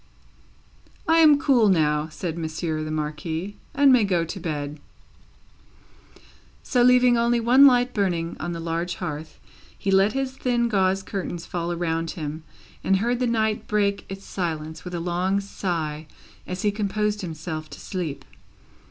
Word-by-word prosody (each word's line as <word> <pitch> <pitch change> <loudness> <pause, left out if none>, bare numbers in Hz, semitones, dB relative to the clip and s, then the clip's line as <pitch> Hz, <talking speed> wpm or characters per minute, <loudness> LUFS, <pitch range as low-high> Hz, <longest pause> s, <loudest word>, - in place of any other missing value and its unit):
"I 325 0 +5
am 305 -3 +7
cool 250 -8 +4
now," 150 -4 +2
said 160 +1 -4
Monsieur 160 -1 -3
the 155 - -5
Marquis, 155 +5 -4 0.2
"and 275 -1 +6
may 245 -3 +5
go 180 -4 +1
to 180 +4 -6
bed." 150 -3 -4 1.8
So, 250 - +1
leaving 250 -1 +5
only 235 0 +2
one 255 +5 +7
light 250 -1 +3
burning 175 -5 -1
on 175 - -3
the 170 - -4
large 165 +1 -2
hearth, 155 +1 -6 0.4
he 195 - -1
let 195 +2 +4
his 270 -1 -1
thin 245 -2 0
gauze 195 -2 +1
curtains 180 -3 -5
fall 175 -1 -3
around 165 -1 -1
him, 155 0 -5 0.4
and 195 - +3
heard 240 +4 0
the 250 - +1
night 220 -2 0
break 200 -1 0
its 195 0 -7
silence 160 -3 -4
with 180 -1 -6
a - - -2
long 180 +3 0
sigh 165 -6 -3 0.4
as 180 0 -4
he 210 - +3
composed 210 0 -1
himself 160 -2 -5
to - - -10
sleep. 170 -7 -5
185 Hz, 155 wpm, -24 LUFS, 160-220 Hz, 1.8 s, am